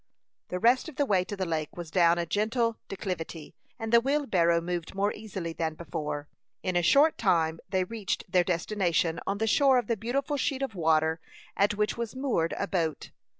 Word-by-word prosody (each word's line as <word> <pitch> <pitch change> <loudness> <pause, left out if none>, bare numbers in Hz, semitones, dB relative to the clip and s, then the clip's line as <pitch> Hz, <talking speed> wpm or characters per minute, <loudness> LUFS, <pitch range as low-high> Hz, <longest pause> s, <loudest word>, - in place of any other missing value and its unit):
The 180 - -3
rest 245 - +3
of 305 - -13
the 285 - +1
way 190 -7 +2
to 205 - -5
the 190 -1 -2
lake 160 -2 -3
was 170 -2 -7
down 170 -1 +4
a 170 - -1
gentle 220 +6 0
declivity, 180 -5 -5 0.2
and 225 -1 -4
the 235 - +7
wheelbarrow 215 - +2
moved 175 +1 -4
more 200 +1 +1
easily 190 -6 -6
than 160 -1 -2
before. 150 -2 -5 0.4
In 185 -1 -1
a 175 - +4
short 285 - +4
time 165 -5 +2
they 185 -1 +1
reached 200 0 -3
their 180 -1 +3
destination, 175 -2 0
on 200 - 0
the 220 - 0
shore 265 +4 +4
of 245 - +1
the 230 - 0
beautiful 265 +7 -2
sheet 275 0 -1
of 270 - -3
water 160 -2 +2 0.4
at 205 +1 +2
which 210 +2 -1
was 235 +1 -4
moored 250 -12 0
a 200 - -1
boat. 165 -5 -2
190 Hz, 195 wpm, -28 LUFS, 170-230 Hz, 0.4 s, the